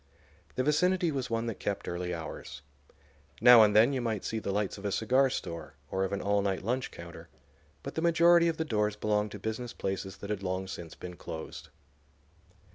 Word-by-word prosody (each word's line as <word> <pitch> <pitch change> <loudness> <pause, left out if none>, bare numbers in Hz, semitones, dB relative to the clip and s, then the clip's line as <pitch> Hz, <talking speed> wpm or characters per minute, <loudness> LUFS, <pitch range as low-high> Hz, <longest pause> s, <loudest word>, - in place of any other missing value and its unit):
The 130 - +1
vicinity 175 +4 +2
was 135 -3 -3
one 115 0 -1
that 115 -3 -4
kept 100 - -3
early 90 0 -3
hours. 80 -4 -7 0.8
Now 120 -2 +9
and 105 -1 +5
then 115 +6 +6
you 130 - -1
might 110 -4 -2
see 110 - -2
the 100 - -3
lights 100 0 -1
of - - -12
a 100 - 0
cigar 130 +6 +3
store 85 -8 -5 0.2
or 95 - 0
of 95 - -2
an 100 - -2
all 100 0 +2
night 95 -1 -1
lunch 125 +5 -1
counter; 85 0 -11 0.5
but 140 - -6
the 160 - -2
majority 170 0 +5
of 165 -1 0
the 160 - -1
doors 105 -6 0
belonged 105 0 0
to - - -5
business 110 +4 -4
places 95 0 -4
that 100 - -6
had 105 -2 -2
long 95 0 -2
since 85 -3 -8
been 90 -1 -9
closed. 80 -1 -8
105 Hz, 200 wpm, -30 LUFS, 95-130 Hz, 0.8 s, Now